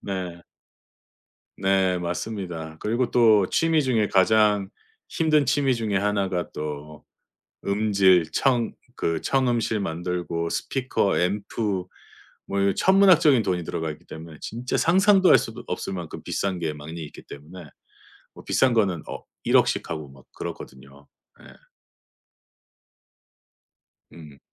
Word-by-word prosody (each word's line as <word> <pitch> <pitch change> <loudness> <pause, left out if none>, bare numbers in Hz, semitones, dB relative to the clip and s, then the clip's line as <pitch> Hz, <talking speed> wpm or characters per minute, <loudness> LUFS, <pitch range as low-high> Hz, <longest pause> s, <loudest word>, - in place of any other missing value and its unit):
네. 90 -3 -5 1.2
네, 95 -2 +1
맞습니다. 85 -2 -5
그리고 120 +3 -1
또 110 -5 +5
취미 165 -1 +2
중에 115 -6 +1
가장 105 0 +3 0.4
힘든 155 -3 +2
취미 135 +1 +2
중에 110 -3 -1
하나가 95 -3 -1
또 75 0 -7 0.6
음질 100 -5 +3
청 120 - +1 0.2
그 85 -1 -1
청음실 120 -5 0
만들고 85 -1 -3
스피커, 130 -6 -1
앰프, 100 +1 -1 0.6
뭐 100 0 -2
이런 100 0 +2
천문학적인 180 - +5
돈이 90 -3 -1
들어가 80 0 -3
있기 - - -16
때문에 80 0 -10
진짜 120 +3 -3
상상도 190 +2 +4
할 - - +8
수도 - - -6
없을 - - -4
만큼 85 -4 -7
비싼 95 -2 -2
게 80 -3 -3
많이 80 +3 -8
있기 - - -13
때문에 80 +5 -11 0.7
뭐 - - -14
비싼 130 -2 +2
거는 95 -8 +1
억 - - -8 0.2
100,000,000 - - +4
씩 - - -2
하고 75 -3 -5
막 70 -1 -17
그렇거든요. 70 +2 -9 0.4
예. - - -15 2.7
음. 75 -4 -13
95 Hz, 240 characters per minute, -24 LUFS, 85-115 Hz, 2.7 s, 할